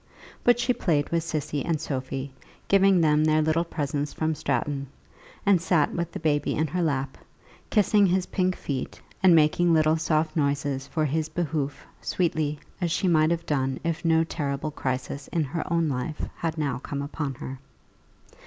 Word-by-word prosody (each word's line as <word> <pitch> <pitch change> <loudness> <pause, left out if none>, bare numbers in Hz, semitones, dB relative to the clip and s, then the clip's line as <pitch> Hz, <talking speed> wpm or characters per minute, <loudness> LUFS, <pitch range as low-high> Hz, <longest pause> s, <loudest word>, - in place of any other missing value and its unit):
But 245 0 +4
she 250 +1 +2
played 155 -10 0
with 170 -1 +1
Cissy 150 -3 -2
and 165 -3 0
Sophie, 135 -2 -4 0.3
giving 195 -2 +5
them 150 -1 +4
their 155 0 +3
little 160 +2 +2
presents 145 -3 -3
from 160 0 0
Stratton; 140 -1 -2 0.6
and 195 -4 +4
sat 165 -4 +2
with 170 -1 -2
the - - -5
baby 145 -2 +1
in 155 - +1
her 175 +4 -2
lap, 140 -4 -1 0.5
kissing 205 -1 +4
his 185 0 +1
pink 185 -1 0
feet 135 -3 -4 0.2
and 185 -3 +7
making 165 +2 +4
little 155 0 +3
soft 155 0 0
noises 140 -2 0
for 155 +2 0
his 155 +2 -1
behoof, 155 -3 -2 0.2
sweetly 160 -4 0 0.2
as 175 - +1
she 190 +3 +1
might 155 -2 +4
have 170 0 -1
done 135 -2 0
if 165 -1 -2
no 165 -1 +4
terrible 145 -2 -3
crisis 135 0 -3
in 165 - 0
her 155 +5 -4
own 165 -1 +2
life 135 +2 -3
had 165 -1 -2
now 145 -5 -1
come 140 +1 -4
upon 145 -1 -4
her. 130 +1 -7
155 Hz, 170 wpm, -26 LUFS, 140-170 Hz, 0.6 s, and